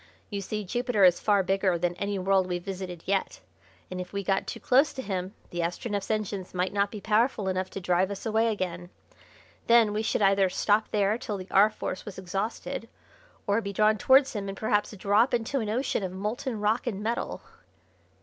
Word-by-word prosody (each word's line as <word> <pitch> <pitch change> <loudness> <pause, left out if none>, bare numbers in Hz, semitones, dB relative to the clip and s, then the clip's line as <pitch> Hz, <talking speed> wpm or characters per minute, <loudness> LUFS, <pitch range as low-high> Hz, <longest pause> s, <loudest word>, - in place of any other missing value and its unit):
You 200 -1 -3
see 210 +2 -4
Jupiter 240 +1 0
is 180 -2 +6
far 205 -2 +3
bigger 190 -1 +1
than 175 +1 0
any 200 0 -2
world 190 0 +2
we've 175 -1 -3
visited 185 -3 -6
yet, 195 0 -1 0.5
and 185 0 -3
if 180 - -8
we 200 0 -2
got 195 0 0
too - - -5
close 275 +4 +3
to 260 - -5
him 190 -2 -4 0.2
the 175 - -4
Astronef's 195 +4 -2
engines 205 -4 -3
might 180 +2 0
not 200 0 +1
be 210 - -7
powerful 215 0 +1
enough 185 0 -1
to - - -6
drive 180 +1 +1
us 200 -1 -6
away 225 +1 +2
again. 180 -5 -3 0.8
Then 230 -3 +5
we 215 - 0
should 220 -1 0
either 195 -1 +4
stop 210 +3 +1
there 210 +2 +1
till 210 -4 -4
the 185 -1 -9
R. 200 +2 +6
Force 185 - -5
was 205 - -9
exhausted 195 +4 -4 0.6
or 205 +2 +2
be 200 -2 -5
drawn 215 +1 +3
towards 265 +3 +5
him 200 -3 -4
and 195 - -6
perhaps 210 -1 +1
drop 205 +6 +3
into 240 +4 -1
an 220 -3 -3
ocean 240 +1 0
of 190 -2 -3
molten 215 +5 -3
rock 215 +4 0
and 210 -3 -3
metal." 230 +2 -3
200 Hz, 200 wpm, -27 LUFS, 190-215 Hz, 0.8 s, is